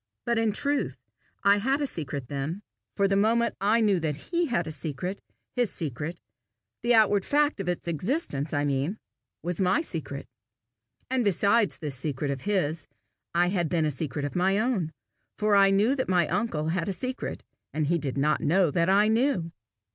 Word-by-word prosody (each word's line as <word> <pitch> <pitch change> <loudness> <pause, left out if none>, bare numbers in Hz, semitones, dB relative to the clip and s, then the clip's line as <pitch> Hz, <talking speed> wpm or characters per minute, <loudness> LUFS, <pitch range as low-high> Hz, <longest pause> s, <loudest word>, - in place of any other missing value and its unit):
But 235 -1 +1
in 225 -1 +2
truth 285 +7 -1 0.5
I 200 0 +6
had 265 +7 +1
a 290 - 0
secret 145 - -4
then; 145 +9 -4 0.3
for 200 -1 +3
the 195 - +1
moment 230 +4 +2
I 215 +4 +3
knew 205 -4 +3
that 155 -3 -1
he 340 - -1
had 175 - 0
a 155 - -5
secret, 160 +5 -4 0.3
his 245 -4 +1
secret 155 +1 -4 0.6
the 240 +1 +3
outward 205 -3 +4
fact 295 -1 +2
of 190 -2 -2
its 175 -1 -3
existence, 170 - -1
I 145 -1 0
mean 140 +8 -1 0.5
was 175 +2 -2
my 185 +11 +3
secret. 155 - -5 0.9
And 260 -2 +2
besides 205 +2 +3
this 150 -4 -4
secret 140 +1 -2
of 135 -2 -4
his, 170 -7 -1 0.5
I 175 +1 +4
had 175 -4 0
then 165 -3 +1
a 150 - +1
secret 145 +1 -3
of 145 - -5
my 190 +2 +2
own. 215 -8 0 0.5
For 210 -1 +3
I 195 0 +6
knew 205 +6 +3
that 260 -6 -2
my 175 -4 +3
uncle 160 -10 -1
had 170 +2 -1
a - - 0
secret, 255 +7 -4 0.3
and 155 -1 -1
he 170 +3 +1
did 140 -2 -3
not 150 +2 +2
know 170 +1 +3
that 170 +2 +2
I 205 +2 +5
knew. 220 -7 +1
185 Hz, 185 wpm, -27 LUFS, 155-220 Hz, 0.9 s, I